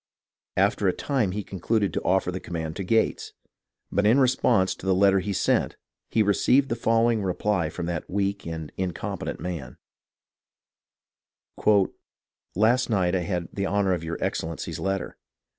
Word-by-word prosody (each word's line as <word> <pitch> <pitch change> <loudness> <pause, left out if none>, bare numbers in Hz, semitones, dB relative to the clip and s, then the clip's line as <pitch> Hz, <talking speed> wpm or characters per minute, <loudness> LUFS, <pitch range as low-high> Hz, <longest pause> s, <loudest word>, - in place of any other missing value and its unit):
After 100 +1 +2
a 90 - +3
time 130 -8 0
he 105 +3 -3
concluded 100 +3 -1
to - - -1
offer 95 -1 +1
the 95 - -4
command 80 -3 -5
to 100 - -3
Gates; 110 +4 0 0.6
but 100 - +1
in 110 +6 +5
response 125 -7 +3
to 95 - -9
the 95 - +3
letter 95 0 +4
he 100 +2 -3
sent 95 - +1 0.3
he 110 - +3
received 130 +7 +3
the 115 - 0
fol 115 0 +2
lowing 115 -2 +2
reply 95 -2 0
from 85 - -5
that 85 -2 -4
weak 100 -1 -1
and 80 -2 -5
incompetent 95 -3 -4
man: 85 -7 -6 2.8
"Last 115 +6 +3
night 95 -5 +1
I 95 - +2
had 90 -1 -3
the 100 -1 -1
honour 100 -1 +1
of 85 -2 -3
your 80 0 -4
Excellency's 80 0 -3
letter. 95 -1 -3
95 Hz, 160 wpm, -25 LUFS, 90-105 Hz, 2.8 s, in